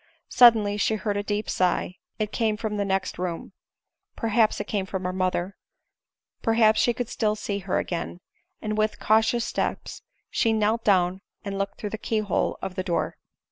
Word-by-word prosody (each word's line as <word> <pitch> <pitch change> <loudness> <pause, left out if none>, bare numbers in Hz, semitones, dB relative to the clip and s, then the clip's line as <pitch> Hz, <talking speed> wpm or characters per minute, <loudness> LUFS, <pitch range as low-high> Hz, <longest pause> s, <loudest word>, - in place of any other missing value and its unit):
Suddenly 220 -4 +6
she 220 +1 +1
heard 210 -1 -2
a 205 - 0
deep 205 +1 -2
sigh 180 0 0
— - - -55
it 215 -1 -2
came 220 -3 0
from 210 -1 -3
the 200 - 0
next 190 -2 -1
room 180 -2 -4 0.3
— - - -59
perhaps 225 -1 +2
it - - -1
came 195 -3 -2
from 190 -1 -4
her 180 0 -2
mother; 185 0 -1 0.9
perhaps 225 -1 +4
she 240 - +3
could 240 0 -3
still 215 -2 0
see 205 -1 -3
her 190 -1 -1
again; 175 0 -3 0.4
and 215 0 -2
with 215 0 +1
cautious 225 +2 +3
steps - - -3 0.3
she 225 -2 +2
knelt 220 +1 +1
down 185 -2 +2 0.2
and 200 -1 -3
looked 195 0 -3
through 210 - -4
the 220 - -5
key 225 - -1
hole 210 -4 0
of 190 -1 -3
the 185 - -2
door. 175 -2 -1
210 Hz, 190 wpm, -25 LUFS, 190-220 Hz, 0.9 s, Suddenly